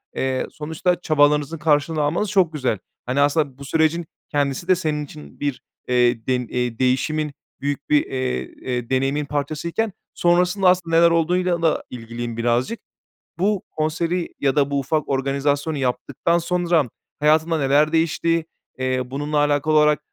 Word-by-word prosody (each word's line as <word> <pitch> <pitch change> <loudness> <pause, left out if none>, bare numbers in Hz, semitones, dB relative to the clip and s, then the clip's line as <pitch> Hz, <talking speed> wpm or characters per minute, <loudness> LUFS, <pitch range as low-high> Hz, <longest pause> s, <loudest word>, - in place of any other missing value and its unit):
Eee, 130 -1 -1
sonuçta 160 +4 -1
çabalarınızın 150 0 +2
karşılığını 150 0 +1
almanız 175 +7 0
çok 185 -5 +2
güzel. 130 -8 0 0.3
Hani, 130 +3 +1
aslında 145 -2 +1
bu 140 - -9
sürecin 160 +3 +1 0.2
kendisi 145 +3 -1
de 185 - +5
senin 155 -4 -2
için 75 - -13
bir, 145 -3 -2 0.3
eee, 120 -2 +2
dem 125 -2 0
eee, 125 -1 -2
değişimin 150 +4 +1 0.3
büyük 140 0 -3
bir, 150 -1 +4
eee, 130 -1 -2 0.2
eee, 125 -2 -3
deneyimin 135 +3 0
parçasıyken 155 +9 -2 0.2
sonrasında 180 +2 +2
aslında 175 -3 +1
neler 170 0 +6
olduğuyla 175 +1 +1
da 165 -2 +1
ilgiliyim 115 -1 -6
birazcık. 120 - 0 0.6
Bu 200 0 +1
konseri 165 +3 -1
ya 135 -2 +1
da 140 -1 +2
bu 140 - +1
ufak 150 +3 -1
organizasyonu 140 +3 0
yaptıktan 135 +5 0
sonra 170 -5 +1 0.3
hayatında 155 +2 +3
neler 145 +2 +3
değişti? 165 0 +1 0.3
Eee, 130 0 0
bununla 145 +3 -3
alakalı 145 +1 +2
olarak 150 -1 +4
150 Hz, 145 wpm, -22 LUFS, 135-165 Hz, 0.6 s, neler